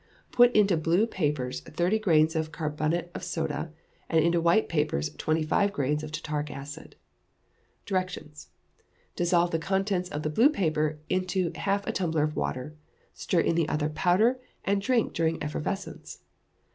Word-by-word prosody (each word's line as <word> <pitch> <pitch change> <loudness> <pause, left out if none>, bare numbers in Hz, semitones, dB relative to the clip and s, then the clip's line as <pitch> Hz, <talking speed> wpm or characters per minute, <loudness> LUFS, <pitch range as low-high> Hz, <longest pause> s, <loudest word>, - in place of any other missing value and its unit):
Put 245 0 +6
into 200 -5 +4
blue 165 +6 +2
papers 145 - -2
thirty 180 +7 0
grains 160 -5 +3
of 160 0 -1
carbonate 155 +3 -2
of - - -6
soda, 165 0 -3 0.4
and 160 -1 +3
into 170 0 +2
white 170 +6 +3
papers 75 - -1
twenty 155 - 0
five 200 +6 +2
grains 150 -3 -1
of 155 -1 -7
tartaric 150 -1 -3
acid. 145 +3 -9 0.9
Directions. 185 -6 -4 0.7
Dissolve 175 0 +2
the 165 - 0
contents 190 +1 -1
of 150 -2 -4
the 155 - -1
blue 235 - +5
paper 155 - 0
in 185 0 0 0.3
half 200 0 -1
a - - -1
tumbler 160 -5 0
of 150 0 -1
water, 125 - -3 0.4
stir 175 - 0
in - - +1
the 165 -2 +1
other 150 0 0
powder, 190 +11 +2 0.3
and 200 0 +1
drink 245 +1 +1
during 165 0 0
effervescence. 175 +6 -5
165 Hz, 155 wpm, -27 LUFS, 150-190 Hz, 0.9 s, Put